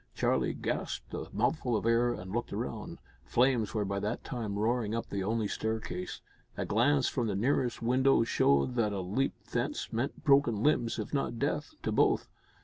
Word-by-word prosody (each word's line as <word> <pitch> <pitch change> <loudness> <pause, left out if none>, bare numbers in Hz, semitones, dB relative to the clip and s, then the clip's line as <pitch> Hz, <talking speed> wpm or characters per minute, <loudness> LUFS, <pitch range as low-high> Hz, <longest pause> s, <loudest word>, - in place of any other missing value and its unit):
Charlie - - +1
gasped - - -3
a - - -4
mouthful 125 -7 0
of - - -4
air 115 +1 +3
and 95 -5 -6
looked 120 +3 -2
round. - - -4 0.3
Flames 120 - +2
were 105 -1 +1
by 100 0 -2
that 105 +4 -3
time 110 -6 -4
roaring 110 0 0
up 115 - -4
the 100 -1 -1
only 110 +1 0
staircase. 110 -5 -3 0.4
A - - -1
glance 130 +5 +3
from 120 -3 -1
the 100 - -1
nearest 120 +2 0
window 130 +1 +4
showed 70 - +2
that 105 -3 +2
a 100 - -2
leap 105 +10 -1 0.2
thence - - -2
meant 120 +6 -2
broken 135 -7 +4
limbs, 120 -6 +2
if 110 +3 -5
not 135 -4 -1
death, 150 - -2
to - - 0
both. - - +3
115 Hz, 180 wpm, -31 LUFS, 105-125 Hz, 0.4 s, window